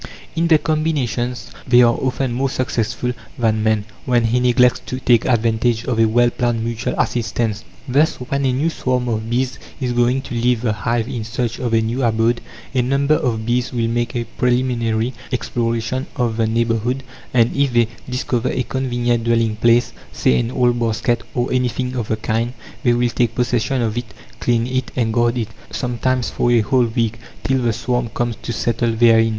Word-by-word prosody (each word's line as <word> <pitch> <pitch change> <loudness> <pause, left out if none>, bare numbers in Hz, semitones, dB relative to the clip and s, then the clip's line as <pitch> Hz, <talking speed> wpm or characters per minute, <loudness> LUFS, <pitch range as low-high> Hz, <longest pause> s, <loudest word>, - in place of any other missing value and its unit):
In 165 +1 +2
their 160 -2 +6
combinations 145 -6 -1 0.2
they 125 0 +6
are 120 0 +5
often 130 -1 -1
more 135 +3 0
successful 125 -1 -1 0.2
than 110 -2 +1
man, 110 -1 +1 0.2
when 120 -2 +2
he 115 +2 +2
neglects 125 0 +4
to 130 - -4
take 120 -3 +3
advantage 115 -1 +1
of 125 -4 -1
a 115 - +6
well 120 +2 +3
planned 120 -2 -1
mutual 115 -1 -2
assistance. 115 -2 -1 0.2
Thus, 150 +6 +3
when 140 +2 -3
a 130 - +3
new 145 +6 0
swarm 125 -4 -1
of 110 -1 -2
bees 125 +2 -1 0.2
is 125 -3 -1
going 120 +2 +2
to - - -7
leave 120 0 +1
the 110 -3 +1
hive 115 +1 -1
in 125 -4 -4
search 115 +1 -3
of 120 -3 0
a 110 - +4
new 115 +4 -2
abode, 115 0 +2 0.3
a 130 - +2
number 140 +4 +2
of 115 -7 0
bees 120 +1 0
will 115 -3 0
make 120 +1 -1
a 120 - 0
preliminary 120 -1 0 0.2
exploration 120 +1 -1
of 120 -4 0
the 115 -1 +2
neighbourhood, 115 +3 0 0.3
and 120 -2 +3
if 140 -1 +2
they 120 -1 +3 0.2
discover 125 -1 -1
a 130 - -1
convenient 120 -2 -1
dwelling 115 -2 +2
place 120 +2 +3 0.2
say, 65 - +2
an 115 - -1
old 120 -1 +1
basket, 115 +1 0
or 120 +1 0
anything 125 0 -1
of 120 -4 -2
the 110 - -1
kind 115 +2 -1 0.3
they 120 - +3
will 120 0 +2
take 120 -1 0
possession 125 +1 0
of 110 -1 -1
it, 120 -4 -5 0.2
clean 120 -1 +1
it, 130 0 -2
and 115 -3 0
guard 120 +1 +2
it, 115 -2 -2 0.2
sometimes 125 0 -1
for 120 - 0
a 120 -2 +4
whole 125 +3 +2
week, 115 -1 -1 0.2
till 135 -1 +1
the 120 -1 +2
swarm 120 +1 -1
comes 120 +1 -2
to - - -6
settle 120 +1 0
therein. 115 0 +5
120 Hz, 190 wpm, -19 LUFS, 115-125 Hz, 0.3 s, their